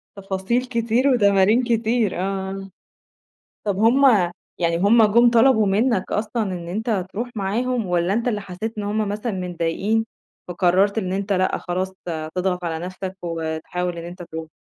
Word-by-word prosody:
تفاصيل 195 +5 -1
كتير 235 +2 +1
وتمارين 210 -1 +4
كتير، 230 -4 0
آه. 195 0 -3 1.0
طَب 200 - 0
هُم 245 +6 +4 0.5
يعني 170 -1 +1
هُم 220 +5 +5
جُم 235 +3 +5
طلَبوا 230 -2 +4
منك 205 0 +1
أصلًا 220 +2 -1
إن 180 -4 -4
أنت 210 -1 -1
ترُوح 240 +4 -4
معاهم 225 +3 -1
والّا 175 +1 +1
أنت 235 +3 0
اللي 210 -3 -1
حسّيت 205 +4 -6
إن - - -2
هُم 210 0 -1
مثلًا 210 +3 -3
متضايقين، 185 +4 -1 0.4
فقرّرت 185 +4 +2
إن 185 -3 -2
أنت 195 +1 -1
لأ، 185 0 +1
خلاص 185 +1 -3 0.2
ت 155 -2 -3
تضغط 180 -1 -1
على 160 -1 -2
نفسك 185 +1 -6
وتحاول 170 +1 -3
إن 165 - -6
أنت 175 +1 -8
ترُوح؟ 160 -1 -7
195 Hz, 155 wpm, -22 LUFS, 180-225 Hz, 1.0 s, هُم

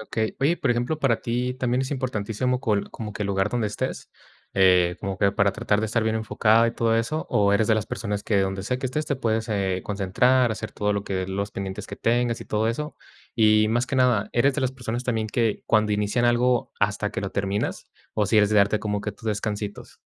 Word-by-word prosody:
Okey. 110 0 -3
Oye, 160 +6 +3
por 135 - 0
ejemplo, 120 +6 0
¿para 130 -6 +1
ti 125 +2 -2
también 130 0 0
es 130 - -4
importantísimo 125 -1 -1
col 105 -6 0
como 105 -2 -6
que 105 - -4
el - - -1
lugar 95 +1 +1
donde 120 -2 0
estés, 105 - -4 0.4
eh, 90 -2 +4
como 95 -2 -4
que 100 - +3
para 100 -1 +2
tratar 105 +1 0
de 110 - 0
estar 115 +1 0
bien 110 0 0
enfocada 110 +1 +3
y 115 - -1
todo 115 -1 +1
eso, 135 +8 -1
o 100 -1 +3
eres 105 +2 +2
de 110 - +5
las 110 -2 -1
personas 105 -3 -3
que 100 -3 +2
donde 95 0 -2
sea 125 +5 -2
que 130 - -2
estés 150 +4 -3
te 140 - 0
puedes, 110 -2 -1
eh, 95 -3 -1
concentrar, 115 +6 +2
hacer 110 -1 -5
todo 105 0 0
lo 100 0 -2
que, 95 -1 -2
los 100 +2 -3
pendientes 95 +1 -5
que - - -8
tengas 120 0 0
y - - -7
todo 110 +1 0
eso? 150 +6 -4 0.4
Y 110 -1 +4
más 120 +3 +1
que - - -4
nada, 125 -5 +3
¿eres 135 +3 +3
de 145 - -1
las 130 0 0
personas 125 -1 -4
también 110 -3 -1
que 115 0 0
cuando 110 -1 +2
inician 105 +4 0
algo 120 0 +2
hasta 105 0 0
que - - -4
lo 100 - -4
terminas, 100 +1 -2 0.3
o 105 -2 +1
si 110 +2 +3
eres 105 -1 +4
de 105 - +2
darte 100 +1 +4
como 105 -1 -2
que 105 0 -4
tus 110 - -18
descansitos? 105 -1 -4
110 Hz, 235 wpm, -24 LUFS, 100-120 Hz, 0.4 s, de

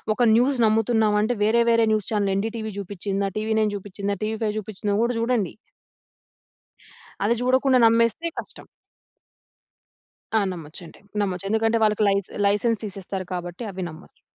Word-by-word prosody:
ఒక - - -3
న్యూస్ 255 +3 +3
నమ్ముతున్నాం 220 0 +2
అంటే 220 +3 +1
వేరే 230 +3 +4
వేరే 230 0 +4
news 215 -2 0
channel 205 -2 +1
ND 215 +3 -1
TV 220 -2 -5
చూపిచ్చిందా? 195 0 -2
TV 220 +1 -1
nine 210 -1 +1
చూపిచ్చిందా? 200 +1 -4
TV 220 +1 -1
five 210 -1 -1
చూపిచ్చిందా? 210 0 -4
అని - - +1
గూడా 240 - +1
చూడండి. 230 -6 0 1.7
అది 220 - +3
జూడకుండా 260 +1 +3
నమ్మేస్తే 230 +7 +3
కష్టం. - - -10 1.7
ఆ! - - +5
నమ్మొచ్చండి. 165 0 -10 0.2
నమ్మొచ్చు. 190 -2 -2
ఎందుకంటే 225 +1 +2
వాళ్ళకి 215 0 +2
లైస్ 200 -1 0 0.2
లైసెన్స్ 210 +2 +1
తీసేస్తారు 195 -1 -5
కాబట్టి 175 +4 -5
అవి 190 -1 -5
నమ్మొచ్చు 160 +3 -15
210 Hz, 145 wpm, -24 LUFS, 195-225 Hz, 1.7 s, ఆ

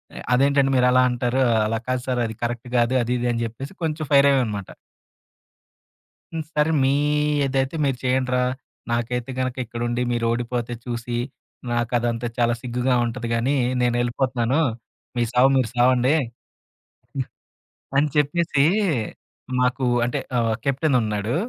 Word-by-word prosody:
"ఆహ్, - - -7
అదేంటంటే 140 +1 +3
మీరు 125 0 +4
అలా 130 0 +5
అంటారు? 125 +1 0 0.3
అలా 115 +1 -1
కాదు 130 0 0
సార్, 125 -1 0
అది 110 - -7
కరెక్ట్ 120 +1 -3
కాదు, 120 +1 +2
అది 120 +1 -1
ఇది" 120 - -1
అని 115 - -2
చెప్పేసి 125 - -7
కొంచెం 155 -1 -2
ఫైర్ 140 0 +7
అయ్యామనమాట. 110 -8 -1 1.6
హ్మ్. 160 -1 -3
సరే 150 +1 +2
మీ 135 - +3 0.5
ఏదైతే 135 +1 -1
మీరు 135 -2 0
చేయండిరా, 130 0 +1 0.5
నాకైతే 120 +2 -2
గనక 130 -1 -1
ఇక్కడుండి 120 +1 -3
మీరోడిపోతే 120 0 -1
చూసి 120 -1 -3 0.5
నా 120 - +1
కదంతా 120 -1 0
చాలా 120 -1 +2
సిగ్గుగా 125 +1 0
ఉంటది 120 0 -4
గానీ 120 +5 +1 0.3
నేనెళ్ళిపోతాను. 120 +2 +1 0.6
మీ 120 - +1
సావు 125 +2 +5
మీరు 125 -4 +1
సావండి? 125 +3 +4
హ్మ్. 120 -3 -6 1.7
అని 145 +2 +4
చెప్పేసీ 150 0 +2 1.0
మాకు 125 +1 +1 0.2
అంటే 120 - -2 0.2
ఆహ్, 115 -1 +1
కెప్టెన్ 140 +1 +2
ఉన్నాడు. 105 +1 -2
125 Hz, 135 wpm, -23 LUFS, 120-135 Hz, 1.7 s, ఫైర్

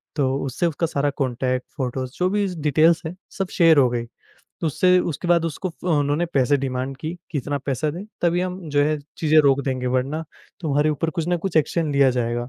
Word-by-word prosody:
तो 135 -3 +1
उससे 135 +6 -1
उसका 165 +1 -1
सारा 145 -2 0
कॉन्टैक्ट, 130 -1 -1
फ़ोटोज़, 130 -1 -3
जो 180 0 +2
भी 205 +1 +1
ज़ 180 -2 -6
डिटेल्स 155 +3 +4
हैं, 160 +3 -5 0.2
सब 195 - -1
शेयर 165 -2 +6
हो 130 -3 +5
गईं। 120 -1 -2 0.6
तो - - -1
उससे 180 +4 +3
उसके 175 +1 -3
बाद 170 -1 +4
उसको 165 +3 -3
फ़ो 175 +1 -5
उन्होंने 145 +3 +1
पैसे 145 -3 +2
डिमांड 130 0 -3
की 155 +5 -5 0.2
कि, 155 - -1
"इतना 145 +2 -2
पैसा 140 +2 0
दें, 175 +6 -7 0.2
तभी 175 0 +2
हम 180 0 -3
जो 145 0 +3
है 155 +1 0 0.2
चीज़ें 155 -1 +4
रोक 140 0 +4
देंगे, 130 -2 -2
वरना 130 +6 -1 0.4
तुम्हारे 150 -2 +1
ऊपर 155 +2 -1
कुछ 165 0 -3
ना 175 - +2
कुछ 195 - -2
एक्शन 155 0 +1
लिया 140 -1 +4
जाएगा।" 120 0 -1
150 Hz, 215 wpm, -22 LUFS, 130-170 Hz, 0.6 s, शेयर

